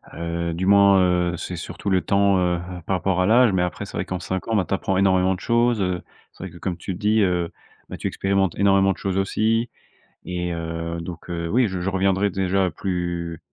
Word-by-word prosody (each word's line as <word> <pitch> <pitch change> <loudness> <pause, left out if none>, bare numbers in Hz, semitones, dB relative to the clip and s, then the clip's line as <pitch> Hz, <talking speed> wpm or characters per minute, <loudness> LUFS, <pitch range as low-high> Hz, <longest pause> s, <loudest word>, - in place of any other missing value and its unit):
Heu, 85 +1 -3
du 95 - -2
moins, 100 0 +6
heu, 90 -1 +1
c'est 90 - -5
surtout 100 +4 -5
le 95 -1 +3
temps, 100 +2 +2
heu 90 -1 +1
heu, - - -3 0.3
par 95 - +1
rapport 90 0 0
à 90 - +2
l'âge, 115 -1 +5
mais 90 - +2
après 90 -4 -3
c'est - - -7
vrai - - -2
qu'en 90 - -4
5 95 +1 -4
ans 115 - 0
ben 95 - +2
tu - - -3
apprends 95 -1 0
énormément 95 -1 +3
de - - -10
choses, 115 0 +2
heu, 90 -2 -1 0.3
c'est - - -12
vrai 95 - -6
que 85 - -13
comme 90 0 -3
tu 90 +2 -5
le - - -7
dis, 105 +3 +2
heu, 90 -3 0 0.4
ben, - - -6
tu - - -3
expérimentes 95 -2 0
énormément 95 -1 +4
de - - -17
choses 95 -1 -1
aussi 110 +4 +1 0.6
et 90 -1 -3
heu, 85 0 -4
donc, 85 +1 -8
heu, 85 -1 -3
oui 120 +3 +3
je 95 -2 -4
je 95 - -1
reviendrai 95 +1 +1
déjà 95 0 0
plus, 85 -1 -3
95 Hz, 235 wpm, -23 LUFS, 90-100 Hz, 0.6 s, moins